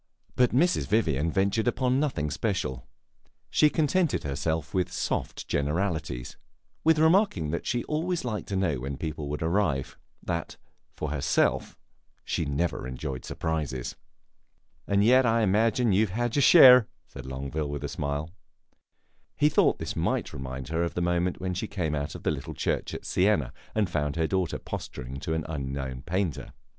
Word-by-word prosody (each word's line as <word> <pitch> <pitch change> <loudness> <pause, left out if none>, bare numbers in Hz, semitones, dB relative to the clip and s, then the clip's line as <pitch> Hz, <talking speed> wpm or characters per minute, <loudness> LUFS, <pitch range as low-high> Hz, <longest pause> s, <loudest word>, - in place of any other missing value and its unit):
But 125 -1 +4
Mrs. 175 +8 +2
Vivian 80 -8 +1
ventured 100 +5 +1
upon 130 +2 +1
nothing 120 - -1
special; 65 -2 -2 0.6
she 150 - +5
contented 160 +2 +1
herself 80 +2 -2
with 90 -2 0
soft - - -3
generalities 75 -3 -2 0.5
with 160 0 +4
remarking 160 - +3
that 85 - -3
she 120 -1 0
always 165 +1 -2
liked 110 -4 -3
to 100 - -3
know 90 -8 0
when 70 +2 -5
people 75 -2 -4
would 75 +2 -3
arrive; 80 -5 0 0.2
that, 85 -3 -3 0.4
for 75 - -4
herself, 70 -2 +1 0.5
she 80 - -1
never 70 -1 -1
enjoyed 65 0 -5
surprises. 75 -6 -3 0.9
"And 100 0 +3
yet 130 +4 +6
I 115 0 +3
imagine 110 +3 +2
you 105 +3 +3
have 95 - -8
had 120 -1 0
your 145 - +3
share," 125 -6 +9 0.2
said 65 -1 -10
Longueville, 70 +3 -3
with 70 0 -4
a - - -1
smile. 70 +3 -3 1.1
He 150 - +4
thought 150 - +3
this - - -5
might - - -1
remind 65 0 -6
her 80 +1 0
of 85 - -2
the 90 - -1
moment 85 +1 0
when 95 0 -2
she 95 +5 -3
came 85 -8 -2
out 70 -1 -3
of - - -9
the - - +1
little - - -5
church - - -2
at - - -8
Siena 90 - +1 0.2
and 110 -3 +2
found 75 -3 -1
her 80 -1 +1
daughter 95 0 -1
posturing 65 +2 -7
to 80 +3 -2
an 80 - -2
unknown 70 -4 -4
painter. 90 +2 -2
85 Hz, 165 wpm, -27 LUFS, 70-110 Hz, 1.1 s, share